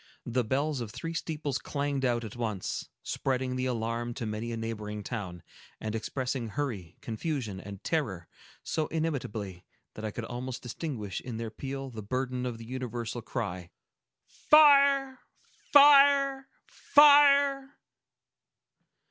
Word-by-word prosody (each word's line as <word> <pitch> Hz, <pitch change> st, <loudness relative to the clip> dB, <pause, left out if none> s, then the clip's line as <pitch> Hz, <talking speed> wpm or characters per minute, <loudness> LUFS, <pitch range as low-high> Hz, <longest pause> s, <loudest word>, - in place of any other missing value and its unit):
The 120 Hz, +1 st, 0 dB
bells 140 Hz, +4 st, -1 dB
of 115 Hz, -, -5 dB
three 165 Hz, +9 st, -6 dB
steeples 150 Hz, -5 st, -3 dB
clanged 140 Hz, -2 st, -2 dB
out 120 Hz, -2 st, +1 dB
at 110 Hz, 0 st, -8 dB
once, 110 Hz, -6 st, -4 dB
spreading 130 Hz, -1 st, -2 dB
the 130 Hz, 0 st, -1 dB
alarm 115 Hz, 0 st, -2 dB
to 120 Hz, -, -4 dB
many 110 Hz, +2 st, -4 dB
a 115 Hz, -, -3 dB
neighboring 105 Hz, -2 st, -5 dB
town, 95 Hz, -8 st, -6 dB, 0.4 s
and 110 Hz, -1 st, -4 dB
expressing 125 Hz, +2 st, -3 dB
hurry, 105 Hz, -, -4 dB
confusion, 115 Hz, -, -4 dB
and 100 Hz, -1 st, -10 dB
terror, 105 Hz, -, -2 dB, 0.4 s
so 155 Hz, -1 st, -1 dB
inimitably 110 Hz, -, -3 dB, 0.3 s
that 110 Hz, -, -9 dB
I 110 Hz, -, -2 dB
could 115 Hz, +2 st, -6 dB
almost 125 Hz, +2 st, -6 dB
distinguish 120 Hz, -, -5 dB
in 120 Hz, -3 st, -6 dB
their 115 Hz, -1 st, -5 dB
peal 135 Hz, +3 st, -6 dB
the 110 Hz, -2 st, -7 dB
burden 125 Hz, +3 st, -2 dB
of 120 Hz, -2 st, -5 dB
the 115 Hz, -, -10 dB
universal 120 Hz, -2 st, -5 dB
cry,—"Fire! 270 Hz, -, +2 dB, 0.5 s
Fire! 280 Hz, -1 st, +6 dB, 0.2 s
Fire!" 285 Hz, -1 st, +5 dB
125 Hz, 130 wpm, -29 LUFS, 110-155 Hz, 0.5 s, Fire